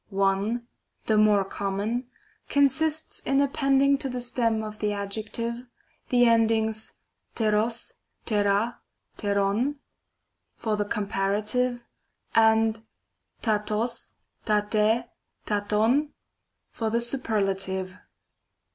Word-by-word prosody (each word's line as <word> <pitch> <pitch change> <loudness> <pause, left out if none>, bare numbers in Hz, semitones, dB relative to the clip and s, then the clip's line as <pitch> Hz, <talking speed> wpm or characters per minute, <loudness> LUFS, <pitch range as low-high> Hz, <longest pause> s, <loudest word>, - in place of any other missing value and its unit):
One 200 +4 0 0.4
(the 220 - +2
more 210 -2 +4
common), 205 +6 -2 0.4
consists 300 +3 +1
in 275 0 +1
appending 275 0 +3
to 275 - -3
the 250 0 -3
stem 230 -2 +1
of 215 -1 -7
the 210 -1 0
adjective, 220 +4 -4 0.4
the 245 -1 +5
endings 220 -1 +2 0.4
rtgog, 220 +1 0 0.3
rtqay 205 +1 +2 0.5
rtQoi/y 205 +6 +1 0.8
for 220 -2 -1
the 205 0 -1
comparative, 210 +4 -1 0.5
and 220 0 +4 0.6
raroz, 215 +1 -1 0.3
ravrjy 215 +2 +2 0.4
ravovj 215 +8 +1 0.6
for 225 -1 -2
the 230 +2 +1
superlative. 195 -6 -1
220 Hz, 90 wpm, -26 LUFS, 205-240 Hz, 0.8 s, the